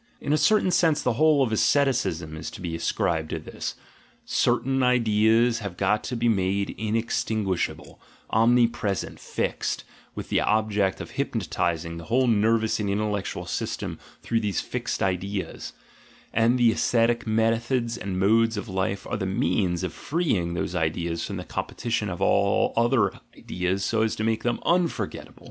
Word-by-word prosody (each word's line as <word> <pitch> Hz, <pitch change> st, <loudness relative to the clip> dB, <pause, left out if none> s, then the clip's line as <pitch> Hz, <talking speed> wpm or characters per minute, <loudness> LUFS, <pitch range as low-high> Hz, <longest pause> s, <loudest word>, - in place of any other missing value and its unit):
In 145 Hz, -, -1 dB
a -, -, +5 dB
certain 185 Hz, +5 st, +3 dB
sense 165 Hz, -4 st, +3 dB
the 125 Hz, -, +2 dB
whole 150 Hz, +2 st, +4 dB
of 120 Hz, -, -1 dB
asceti 140 Hz, +5 st, +3 dB
cism 80 Hz, -11 st, -3 dB
is 80 Hz, -, -6 dB
to -, -, -10 dB
be 85 Hz, -2 st, -4 dB
ascribed 80 Hz, -1 st, -1 dB
to -, -, -2 dB
this: 75 Hz, -, -6 dB, 0.5 s
certain 135 Hz, +2 st, +1 dB
ideas 115 Hz, -1 st, +3 dB
have 100 Hz, -5 st, -6 dB
got 105 Hz, +2 st, +1 dB
to 125 Hz, -, -3 dB
be 120 Hz, 0 st, 0 dB
made 100 Hz, -2 st, +1 dB
inextinguishable, 110 Hz, -3 st, -2 dB, 0.3 s
omnipresent, 115 Hz, -3 st, +2 dB
"fixed," -, -, -2 dB, 0.3 s
with -, -, -6 dB
the -, -, +2 dB
object 105 Hz, -3 st, +1 dB
of -, -, -8 dB
hypnotising 85 Hz, -1 st, -2 dB
the 85 Hz, -, -8 dB
whole 130 Hz, +8 st, +2 dB
nervous 110 Hz, -1 st, +2 dB
and 105 Hz, -2 st, -1 dB
intellectual 105 Hz, 0 st, -2 dB
system -, -, -4 dB, 0.2 s
through 115 Hz, -, +1 dB
these 105 Hz, -5 st, -1 dB
"fixed -, -, -3 dB
ideas" 95 Hz, +1 st, -3 dB, 0.3 s
— -, -, -27 dB
and 115 Hz, +3 st, +3 dB
the 120 Hz, -2 st, +5 dB
ascetic 115 Hz, +1 st, +1 dB
methods 115 Hz, +2 st, +1 dB
and 100 Hz, -5 st, -4 dB
modes 115 Hz, +3 st, +3 dB
of 105 Hz, -, -4 dB
life 95 Hz, 0 st, -2 dB
are -, -, -3 dB
the 95 Hz, -, -2 dB
means 95 Hz, -4 st, 0 dB
of 90 Hz, -, -3 dB
freeing 110 Hz, -, -1 dB
those 85 Hz, -, -2 dB
ideas 85 Hz, 0 st, -1 dB
from -, -, -4 dB
the -, -, -5 dB
competition 115 Hz, -3 st, -3 dB
of 85 Hz, -, -5 dB
all 100 Hz, 0 st, +2 dB
other 115 Hz, -4 st, +2 dB, 0.2 s
ideas 90 Hz, +2 st, -2 dB
so 110 Hz, +1 st, +1 dB
as 110 Hz, -1 st, +1 dB
to 110 Hz, -, -3 dB
make 110 Hz, 0 st, 0 dB
them 120 Hz, -1 st, -1 dB
"unforgettable." 175 Hz, -1 st, -1 dB
110 Hz, 160 wpm, -25 LUFS, 95-120 Hz, 0.5 s, a